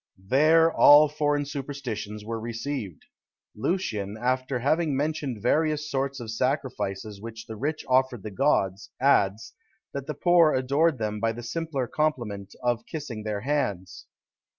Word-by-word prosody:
There 160 +6 +5
all 150 +1 +8
foreign 145 -1 0
superstitions 125 -7 -5
were 115 0 -3
received. 115 - -5 0.5
Lucian, 105 - -2
after 130 +2 0
having 150 +3 +1
mentioned 140 -6 -2
various 150 +2 +1
sorts 135 0 -1
of 115 -2 -6
sacrifices 110 -5 -2
which 115 0 -8
the 110 - -7
rich 150 +7 -3
offered 130 -4 +2
the 110 - -6
gods, 100 -5 +1
adds, 110 -6 +2 0.4
that 140 -1 -5
the 150 - -4
poor 170 -1 +4
adored 140 +4 +2
them 105 -2 -3
by 115 +1 0
the 120 +1 -8
simpler 145 +1 -3
compliment 120 -9 -2
of 120 -1 0
kissing 140 -8 -6
their 105 -1 -3
hands. 100 -10 -2
130 Hz, 140 wpm, -26 LUFS, 110-145 Hz, 0.5 s, all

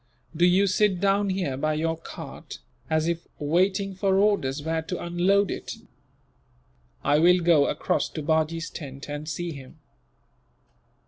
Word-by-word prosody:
Do 175 +3 +4
you 185 +3 +4
sit 195 -1 +2
down 200 +1 +2
here 185 -8 -1
by 155 +2 0
your 165 +1 0
cart, 165 - -9 0.3
as 160 0 +1
if 170 0 -2
waiting 190 +6 +1
for 190 0 +1
orders 175 -9 +1
where 160 +1 -1
to 175 +3 -5
unload 185 +3 +1
it. - - -5 1.3
I 145 +2 +3
will 180 +3 +6
go 165 -4 +4
across - - -1
to 155 - -4
Bajee's 160 +2 0
tent, 140 -3 -8
and 145 +1 -5
see 175 +2 -3
him." 140 +1 -11
170 Hz, 145 wpm, -25 LUFS, 155-190 Hz, 1.3 s, will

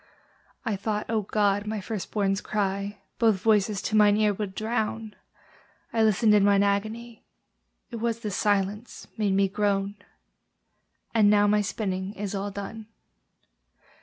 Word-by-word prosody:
I 220 - 0
thought, 210 +2 -2
O 220 -1 +1
God! 205 0 0
my 215 0 -2
first 205 0 -5
born's 195 -2 0
cry 200 -1 -2 0.2
Both 220 -4 +3
voices 210 -2 +2
to 215 - -1
mine 210 -1 +5
ear 210 -1 +3
would 195 -1 -5
drown: 220 -1 -2 0.8
I 225 - +2
listened 215 0 +4
in 205 -1 +5
mine 200 0 +4
agony, 220 +4 -2 0.7
It 235 - -5
was 230 0 -2
the 210 - -3
silence 205 +3 -1
made 205 -3 0
me 195 0 +3
groan! 200 0 -1 1.2
And 215 -3 +5
now 205 0 +5
my 210 0 +3
spinning 190 -2 -3
is 200 0 -4
all 200 +1 -3
done. 205 +2 -7
210 Hz, 145 wpm, -26 LUFS, 200-220 Hz, 1.2 s, mine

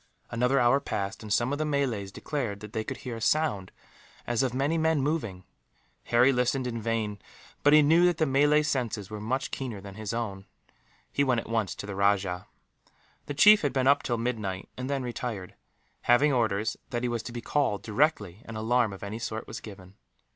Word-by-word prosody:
Another 125 +4 +2
hour 120 +3 +4
passed, 100 -6 -4
and 105 -2 -8
some 120 +5 +2
of 145 - -2
the - - +1
Malays 135 -10 -1
declared 115 -6 -4
that 105 0 -9
they 110 -2 -1
could 130 +3 -5
hear 120 -2 -4
a - - -9
sound 130 -11 +1 0.5
as 120 0 0
of 130 -2 +1
many 140 +6 0
men 160 -1 +2
moving. 130 - -2 0.6
Harry 125 +3 +4
listened 125 +1 +1
in 115 -2 -3
vain, 110 -2 -2 0.4
but 145 - +5
he 150 0 +7
knew 165 +4 +5
that 175 -2 +1
the 160 - +2
Malays' 145 +2 +3
senses 115 -8 -2
were 105 -1 -5
much 130 +5 -2
keener 125 -6 -4
than 100 0 -10
his 105 0 -5
own. 100 -5 -4 0.6
He 140 - +2
went 125 -4 +2
at - - -13
once 110 -4 -1
to - - -7
the 100 - -5
rajah. 95 -2 +1 0.8
The 145 - -4
chief 210 +6 +7
had 145 -4 0
been 130 -2 +1
up 140 +1 +5
till 120 -2 -1
midnight, 110 -6 -3
and 130 +1 -5
then 140 -2 -1
retired; 120 -6 -5 0.6
leaving 140 +4 +5
orders 110 -3 0
that 120 0 -3
he - - +1
was 120 -2 -2
to 110 - -8
be 120 - -5
called, 130 -6 0
directly 105 - 0
an 115 - -8
alarm 110 0 +1
of 95 - -10
any 105 +3 -5
sort 110 -1 -4
was - - -7
given. 95 -3 -11
120 Hz, 205 wpm, -28 LUFS, 105-135 Hz, 0.8 s, he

